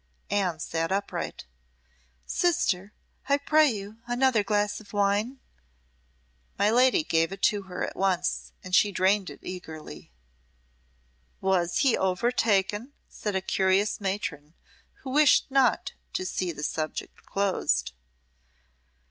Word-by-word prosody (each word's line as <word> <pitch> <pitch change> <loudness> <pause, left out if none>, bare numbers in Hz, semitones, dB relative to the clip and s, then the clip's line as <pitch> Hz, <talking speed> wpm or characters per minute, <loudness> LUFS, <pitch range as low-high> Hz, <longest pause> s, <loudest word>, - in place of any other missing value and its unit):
Anne 190 -5 +1
sat 165 +1 -2
upright. 200 - -3 0.8
"Sister 210 - +1 0.4
I 280 - +5
pray 305 +1 +4
you 210 -1 -6
another 245 -2 +2
glass 205 0 0
of 215 -1 -16
wine." 205 +6 +1 1.2
My 205 +1 +3
lady 255 +7 +4
gave 165 - +1
it 195 0 -8
to 205 -1 +3
her 180 - -2
at - - -7
once, 185 -2 0
and 185 - -9
she 205 +1 +5
drained 190 +1 +2
it - - -11
eagerly. 160 - -8 1.3
"Was 180 -3 +1
he 270 -5 +4
overtaken?" 205 +3 +1 0.2
said 210 -2 -4
a 190 - +1
curious 190 +3 +1
matron, 170 -6 -4 0.5
who 260 - -5
wished 295 -1 +4
not 265 -3 +2 0.2
to 185 - -2
see 185 -1 -2
the 150 -2 -7
subject 155 +1 -4
closed. 185 - 0
200 Hz, 120 wpm, -27 LUFS, 185-230 Hz, 1.3 s, I